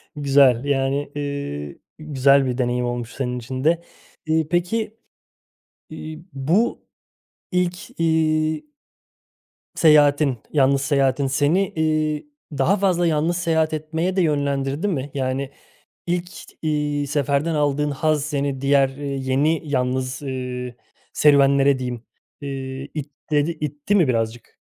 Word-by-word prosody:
Güzel, 140 -3 +4
yani, 140 +1 0
ııı, 140 - -4 0.2
güzel 140 -2 +3
bir 125 -1 -2
deneyim 125 -1 0
olmuş 120 -1 -4
senin 125 -2 -2
için 130 +2 -5
de. 165 +2 +2 0.4
İii, 160 -1 +1
peki, 210 +7 -1 0.9
iii, 155 +1 -8
bu 165 - +1 0.7
ilk, 180 -2 -2
iii 155 -1 +1 1.1
seyahatin, 145 -4 +4
yalnız 140 -2 +3
seyahatin 140 -1 +1
seni, 150 +8 +2
iii, 155 - 0 0.3
daha 170 +10 +3
fazla 180 -3 +2
yalnız 165 +2 +1
seyahat 160 -3 +1
etmeye 160 +4 -2
de 190 - +3
yönlendirdi 140 +1 0
mi? 145 -6 -2
Yani 135 0 -2 0.6
ilk, 175 +1 -1 0.3
iii, 150 -2 -1
seferden 145 +2 0
aldığın 150 0 +1
haz 150 +1 0
seni 140 -3 -2
diğer, 140 0 +4
iii, 135 -1 -5
yeni, 150 +5 +2
yalnız, 130 -1 -1
ııı, 125 -2 -4 0.4
serüvenlere 140 -1 +4
diyeyim, 125 -2 -4 0.4
ııı, 140 -1 -4 0.4
itledi 150 +1 -2
itti 150 +6 -2
mi 175 -8 +4
birazcık? 115 -1 -2
145 Hz, 115 wpm, -22 LUFS, 135-155 Hz, 1.1 s, Güzel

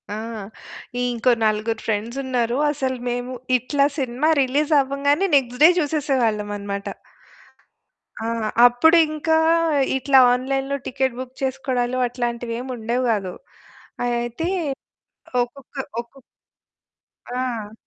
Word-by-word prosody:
ఆ! - - -4 0.8
ఇంకో 245 0 +1
నలుగురు 215 +1 0
ఫ్రెండ్సున్నారు. 235 +3 -1
అసలు 265 -3 -2
మేము 245 +1 -3 0.2
ఇట్లా 280 +3 +1
సినిమా 265 +3 0
రిలీజ్ 285 +4 0
అవ్వంగానే 285 +6 +1
నెక్స్ట్ 250 -2 +1
డే 320 - +10
చూసేసేవాళ్ళమనమాట. 215 -9 -1 1.4
ఆ! - - -1 0.4
అప్పుడు 245 +8 +5
ఇంకా 310 +1 0 0.6
ఇట్లా 265 0 +4
ఆన్‌లైన్‌లో 270 +2 -1
టికెట్ 260 -1 -1
బుక్ 255 0 -7
చేసుకోవడాలు 255 -2 -1
అట్లాంటివేమీ 240 0 -4
ఉండేవి 235 +3 -1
గాదు. 195 -4 -2 0.7
అయితే 240 +6 -2 1.0
ఒక్కొక్క 260 +3 -13 0.3
ఒక్కొ 240 +3 -20 1.1
ఆ! 245 -4 -4
250 Hz, 95 wpm, -22 LUFS, 235-275 Hz, 1.4 s, డే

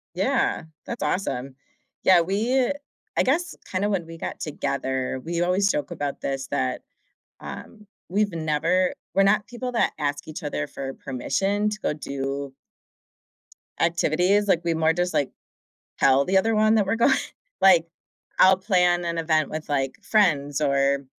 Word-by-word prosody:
Yeah, - - +1 0.2
that's 235 - -5
awesome. 135 -8 -2 0.5
Yeah, 185 -2 +6
we, 225 +9 +1
uh - - +1 0.4
I - - +3
guess, 320 +5 0
kinda 195 +2 0
when 175 -5 -1
we 165 - -9
got - - -5
together- 130 -3 -2
we 170 +1 -1
always 185 +3 +2
joke 145 - -1
about 145 -1 -4
this- 135 -1 -3
that, 65 -2 -1 0.6
um, 210 - -9 0.2
we've 205 +3 +1
never 165 +3 +1 0.2
we're 195 - +5
not 210 +1 +3
people 250 +1 -5
that 235 - +1
ask 145 -1 -2
each 155 - -7
other 110 - -3
for 135 -1 -6
permission 195 +11 -1
to 210 - -5
go - - 0
do 140 -1 -4 1.3
activities, 180 +4 +2
like, 175 -3 +3
we 170 -1 +1
more 160 0 +3
just, 175 +1 -1
like, 140 - +1 0.7
tell 135 +1 +4
the 190 +4 +3
other 225 +4 +1
one 215 +1 +4
that 205 -3 +2
we're 200 +4 0
going 235 - +4 0.5
like, 180 -4 +6 0.5
I'll 185 0 +7
plan 180 -3 +2
an 170 -1 -2
event 155 -2 +1
with, 155 0 -5
like, 135 -2 -1
friends 145 -9 +2
or 140 -1 +2
170 Hz, 160 wpm, -24 LUFS, 140-195 Hz, 1.3 s, I'll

